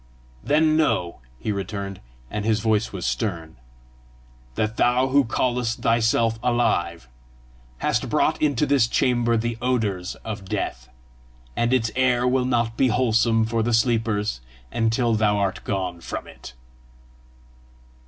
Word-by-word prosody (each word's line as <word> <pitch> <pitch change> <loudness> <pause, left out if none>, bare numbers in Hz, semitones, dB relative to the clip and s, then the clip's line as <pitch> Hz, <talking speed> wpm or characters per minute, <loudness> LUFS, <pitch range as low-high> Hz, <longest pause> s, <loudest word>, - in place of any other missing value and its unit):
"Then 155 +1 +3
know," 90 - 0 0.2
he 110 - -2
returned, 100 -1 -5 0.3
and 105 -1 -3
his 110 0 +1
voice 110 -1 +1
was 95 -3 -5
stern, 85 - -3 1.0
"that 110 - -1
thou 125 +2 +3
who 140 +1 +4
callest 120 0 -1
thyself 115 0 +2
alive, 90 - 0 0.7
hast - - -1
brought - - +1
into 150 -2 +2
this 140 -5 +3
chamber 120 -1 +1
the 115 0 -2
odours 110 -8 -1
of 105 -3 -5
death, 60 +1 -3 0.7
and 120 +1 +1
its 115 -4 +1
air 125 -1 +2
will 125 0 +2
not 120 -2 0
be 135 - +3
wholesome 115 -1 +2
for 115 0 -1
the 115 +1 +2
sleepers 110 - 0 0.3
until 115 +1 +1
thou 105 -1 +2
art 100 -2 -1
gone 90 -3 -3
from - - -5
it!" - - -12
115 Hz, 135 wpm, -23 LUFS, 105-125 Hz, 1.0 s, who